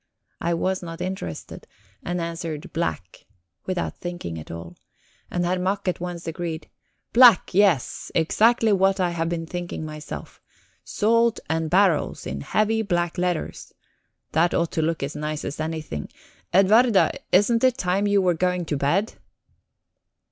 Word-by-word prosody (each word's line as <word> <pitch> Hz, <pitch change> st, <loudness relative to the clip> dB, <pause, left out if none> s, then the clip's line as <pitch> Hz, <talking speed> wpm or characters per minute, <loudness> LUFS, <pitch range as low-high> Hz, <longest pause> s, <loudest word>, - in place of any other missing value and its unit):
I 170 Hz, 0 st, 0 dB
was 190 Hz, +2 st, -1 dB
not 165 Hz, -1 st, -7 dB
interested, 180 Hz, -, -6 dB, 0.3 s
and 175 Hz, 0 st, -3 dB
answered 165 Hz, -2 st, -5 dB
"black," 130 Hz, -, -4 dB, 0.4 s
without 185 Hz, -2 st, -3 dB
thinking 175 Hz, -, -5 dB
at 75 Hz, -, -11 dB
all. 85 Hz, +1 st, -8 dB, 0.5 s
And 175 Hz, 0 st, -1 dB
Herr 180 Hz, +1 st, 0 dB
Mack 195 Hz, +2 st, -1 dB
at 180 Hz, -, 0 dB
once 175 Hz, -1 st, -5 dB
agreed: 165 Hz, 0 st, -4 dB, 0.5 s
"Black, 240 Hz, -4 st, +7 dB
yes 185 Hz, -8 st, +2 dB
exactly 220 Hz, +7 st, +3 dB
what 195 Hz, 0 st, +3 dB
I 180 Hz, -2 st, +1 dB
had 165 Hz, -1 st, -1 dB
been 165 Hz, -1 st, -3 dB
thinking 175 Hz, -2 st, -5 dB
myself. 155 Hz, 0 st, -8 dB, 0.4 s
'Salt 230 Hz, +2 st, +2 dB
and 160 Hz, -1 st, 0 dB
barrels' 185 Hz, -2 st, +2 dB
in 70 Hz, +1 st, -4 dB
heavy 215 Hz, -, +1 dB
black 175 Hz, -3 st, -1 dB
letters 180 Hz, -2 st, -2 dB, 0.6 s
that 170 Hz, +2 st, +2 dB
ought 170 Hz, -1 st, 0 dB
to 160 Hz, -, 0 dB
look 160 Hz, -1 st, -1 dB
as 140 Hz, +3 st, -4 dB
nice 150 Hz, 0 st, -4 dB
as 140 Hz, -, -5 dB
anything... 155 Hz, -, -4 dB, 0.4 s
Edwarda, 205 Hz, +3 st, +5 dB, 0.2 s
isn't 230 Hz, +5 st, +4 dB
it 255 Hz, -1 st, +4 dB
time 190 Hz, +1 st, +1 dB
you 200 Hz, -1 st, +3 dB
were 180 Hz, -1 st, +3 dB
going 180 Hz, +1 st, 0 dB
to 150 Hz, -2 st, -2 dB
bed?" 170 Hz, +10 st, +1 dB
175 Hz, 150 wpm, -24 LUFS, 160-195 Hz, 0.6 s, Black